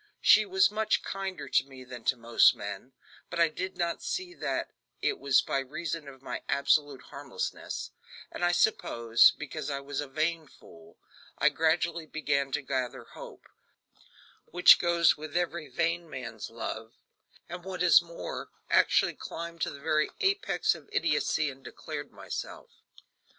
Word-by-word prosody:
She 215 0 +6
was 190 +1 +4
much 215 +1 0
kinder 195 -5 -5
to 130 - +3
me 135 -1 -12
than 125 -2 -10
to 130 - +2
most 115 0 +5
men, 100 +5 -7 0.4
but - - -4
I 170 -1 +5
did 185 +4 -5
not 170 -1 -1
see 365 -1 -4
that - - -3 0.3
it 415 - -1
was 140 -2 +3
by 135 - -1
reason 150 +3 -5
of 135 -1 -12
my - - -5
absolute 145 -1 +2
harmlessness; 140 -2 -5 0.4
and, - - -6
I 175 - +4
suppose, 115 - +4
because 150 -1 -5
I 140 -1 -2
was 140 +1 -4
a 145 - -5
vain 155 +3 -1
fool, 85 -9 -17 0.4
I - - +4
gradually 165 0 0
began 140 -3 -1
to 150 - -1
gather 130 -2 -3
hope - - -11 1.0
which 180 +1 +7
goes 170 -1 +3
with 155 +1 -4
every 170 -2 -2
vain 170 0 -1
man's 115 -6 -7
love 115 0 -6 0.5
and 175 0 -7
what 185 -1 -3
is 175 0 +7
more, 170 0 -7 0.2
actually - - +4
climbed 170 0 -7
to - - +1
the 140 - -9
very 155 +1 +1
apex 395 +1 +1
of - - -13
idiocy 155 - +1
and 135 0 -16
declared - - -7
myself. - - -7
155 Hz, 155 wpm, -29 LUFS, 135-170 Hz, 1.0 s, which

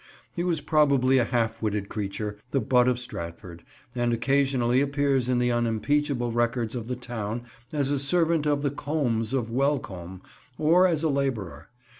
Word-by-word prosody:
He 175 - -2
was 170 -4 0
probably 140 -4 +3
a 120 - +2
half 115 -2 -1
witted 105 -2 -1
creature, 105 0 -4
the 135 - +1
butt 125 -1 +3
of 125 -1 +2
Stratford, 85 -7 -8 0.3
and 120 -1 0
occasionally 130 0 +2
appears 140 -3 +1
in 125 - +2
the 125 0 +2
unimpeachable 120 +3 0
records 120 -1 0
of 120 -3 -5
the 125 - -2
town 120 -2 -5 0.3
as 145 -2 0
a 145 - +1
servant 160 +2 +1
of 145 -1 +1
the 140 - +1
Combes 140 -7 -1
of 120 -4 -1
Welcombe, 105 -10 -2 0.4
or 170 +4 +5
as 165 -3 0
a 160 - +2
labourer. 110 - -2
125 Hz, 165 wpm, -26 LUFS, 115-140 Hz, 0.4 s, or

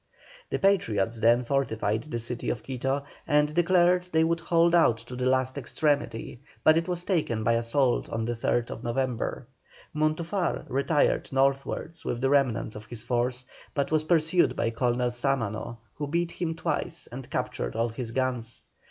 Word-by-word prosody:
The - - 0
Patriots 115 - +1
then 120 +2 +4
fortified 115 -4 0
the 150 -6 -4
city 120 +1 -3
of - - -3
Quito, 135 +2 -2 0.2
and 150 0 +3
declared 180 +1 +3
they 160 0 +4
would 165 +1 +1
hold 170 0 +3
out 165 -10 +5
to 120 +2 -10
the 125 0 -1
last 130 +1 +1
extremity, 135 -4 -1 0.2
but 155 - +6
it 165 +2 +1
was 175 -1 -2
taken 155 - 0
by 115 - +3
assault 120 +3 +2
on 115 0 -2
the 120 - -1
3rd 115 0 -1
November. 125 +1 -2 0.5
Montufar 160 +4 -1
retired 140 +3 +1
northwards 135 +4 0
with 120 - -2
the 135 +2 +1
remnant 130 -6 +1
of 105 0 -8
his 110 -1 -7
force, 125 +1 -1 0.3
but 140 -1 0
was 155 -1 +2
pursued 165 +1 +3
by 115 - 0
Colonel 120 +1 0
Sámano, 120 -3 -1 0.2
who 145 - -4
beat 170 +3 0
him 165 -2 -3
twice - - -3
and - - -8
captured - - -3
all 115 +1 +1
his 115 +1 -5
guns. 125 -2 -2
130 Hz, 165 wpm, -27 LUFS, 120-155 Hz, 0.5 s, but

